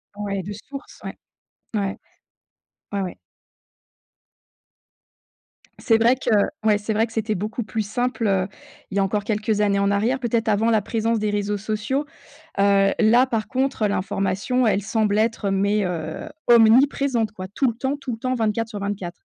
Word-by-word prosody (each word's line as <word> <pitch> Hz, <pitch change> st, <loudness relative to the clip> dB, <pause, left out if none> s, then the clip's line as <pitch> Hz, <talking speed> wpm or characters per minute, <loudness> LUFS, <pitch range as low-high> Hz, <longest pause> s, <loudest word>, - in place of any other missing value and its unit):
Ouais. 200 Hz, -2 st, -3 dB
De 205 Hz, +3 st, -6 dB
source, 275 Hz, +7 st, -10 dB
ouais. -, -, -7 dB, 0.6 s
Ouais. 200 Hz, -2 st, -1 dB, 1.0 s
Ouais, 200 Hz, -1 st, -1 dB
ouais. 180 Hz, -2 st, -5 dB, 2.6 s
C'est 225 Hz, -, +3 dB
vrai 235 Hz, +3 st, +4 dB
que 260 Hz, -, -4 dB, 0.3 s
ouais, 210 Hz, -1 st, +4 dB
c'est 210 Hz, +1 st, -3 dB
vrai 220 Hz, +2 st, +2 dB
que 225 Hz, -, -15 dB
c'était 220 Hz, -1 st, -1 dB
beaucoup 215 Hz, +4 st, -3 dB
plus 220 Hz, +1 st, -3 dB
simple, 245 Hz, +2 st, -1 dB
heu, 190 Hz, -1 st, +1 dB, 0.4 s
il 200 Hz, -, -2 dB
y -, -, +4 dB
a -, -, +3 dB
encore 205 Hz, +1 st, -1 dB
quelques 215 Hz, 0 st, -1 dB
années 200 Hz, -1 st, +2 dB
en 200 Hz, 0 st, +2 dB
arrière. 225 Hz, +6 st, +1 dB
Peut-être 235 Hz, -2 st, -1 dB
avant 220 Hz, +2 st, +2 dB
la 220 Hz, -2 st, +3 dB
présence 225 Hz, +1 st, 0 dB
des 210 Hz, -1 st, -1 dB
réseaux 205 Hz, 0 st, -1 dB
sociaux, 215 Hz, +7 st, -2 dB, 0.5 s
heu, 195 Hz, 0 st, +4 dB
là 235 Hz, +4 st, +5 dB
par 225 Hz, -4 st, -2 dB
contre 265 Hz, -4 st, 0 dB
l'information 200 Hz, +5 st, 0 dB
elle 205 Hz, -1 st, +2 dB
semble 210 Hz, 0 st, +1 dB
être 220 Hz, -2 st, 0 dB
mais, 200 Hz, +1 st, +1 dB
heu, 160 Hz, -3 st, -4 dB, 0.2 s
omniprésente 235 Hz, 0 st, +4 dB
quoi 185 Hz, -3 st, -7 dB
tout 260 Hz, +7 st, 0 dB
le 235 Hz, -, -2 dB
temps, 265 Hz, +3 st, -1 dB
tout 265 Hz, -3 st, -5 dB
le 225 Hz, -, -5 dB
temps 255 Hz, +2 st, -1 dB
24 225 Hz, -1 st, 0 dB
sur 215 Hz, -2 st, -6 dB
24. 195 Hz, -3 st, -3 dB
215 Hz, 170 wpm, -23 LUFS, 200-230 Hz, 2.6 s, là